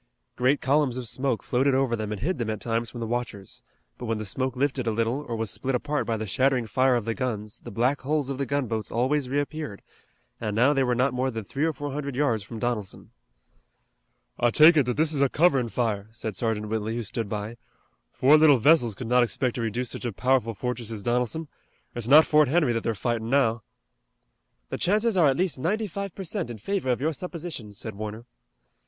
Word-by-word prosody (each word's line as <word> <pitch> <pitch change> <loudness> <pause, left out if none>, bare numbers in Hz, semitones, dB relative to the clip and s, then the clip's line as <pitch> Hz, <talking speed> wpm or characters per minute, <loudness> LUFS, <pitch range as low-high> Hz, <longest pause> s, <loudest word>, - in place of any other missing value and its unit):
Great 130 +3 +2
columns 135 -2 +2
of 125 -2 -5
smoke 130 0 -1
floated 130 +2 +2
over 130 -3 +1
them 110 -2 -4
and 105 -2 -4
hid 175 +3 -1
them 115 -2 -2
at 110 -2 -3
times 115 0 -1
from 120 - -9
the 115 - -3
watchers, 115 -4 -4 0.4
but 120 - -5
when 115 -1 0
the 110 - -5
smoke 130 +5 -2
lifted 130 -2 -1
a - - +2
little 115 +6 -1
or 115 - -2
was 110 -2 -2
split 135 -1 -2
apart 145 +4 -1
by 115 -1 0
the 110 - -4
shattering 130 +4 +1
fire 130 +3 +2
of 120 -3 -1
the 115 - -1
guns 110 -5 -4
the - - -10
black 125 +7 0
hulls 145 0 0
of 135 -1 -4
the 140 - 0
gunboats 120 -6 -2
always 130 +3 0
reappeared, 145 -4 -3 0.6
and 105 -2 -3
now 130 +6 +4
they 135 - +1
were 125 -1 +1
not 130 +1 +1
more 130 +1 0
than 115 -3 -5
three 140 +9 -2
or 165 - +2
four 145 0 -5
hundred 140 -1 -4
yards 130 -6 +1
from 115 +3 -8
Donelson. 110 -4 -4 1.3
"I 120 - +4
take 155 +7 +7
it 145 -5 +3
that 125 - -1
this 155 0 +2
is 140 - 0
a 140 - +4
coverin' 140 -7 +3
fire," 105 -2 -1
said 110 -2 -5
Sergeant 105 -1 -2
Whitley, 110 0 -2
who 120 - -2
stood 110 0 -4
by. 105 +2 -4 0.5
"Four 145 +4 +5
little 150 -3 +6
vessels 120 -4 +4
could 125 - -6
not 125 +1 +4
expect 120 +1 0
to 120 - -4
reduce 115 +2 -2
such - - -6
a 120 - -1
powerful 125 +1 +1
fortress 125 0 -3
as 110 -3 -5
Donelson. 125 +7 -1 0.5
It's 120 -2 -4
not 150 +4 +8
Fort 150 -1 +4
Henry 145 -3 +2
that 115 - -1
they're 115 - -1
fightin' 115 +1 -2
now." 120 -4 +2 1.1
"The - - -4
chances 215 +3 +2
are 170 -5 +5
at 135 -1 +2
least 180 -6 0
ninety 210 +10 0
five 200 -1 -5
per 195 - -6
cent 180 - -3
in 120 - -6
favor 170 - -2
of 125 0 +1
your 160 +3 0
supposition," 165 - -6
said 110 +2 -6
Warner. 110 +3 -6
125 Hz, 225 wpm, -26 LUFS, 115-145 Hz, 1.3 s, not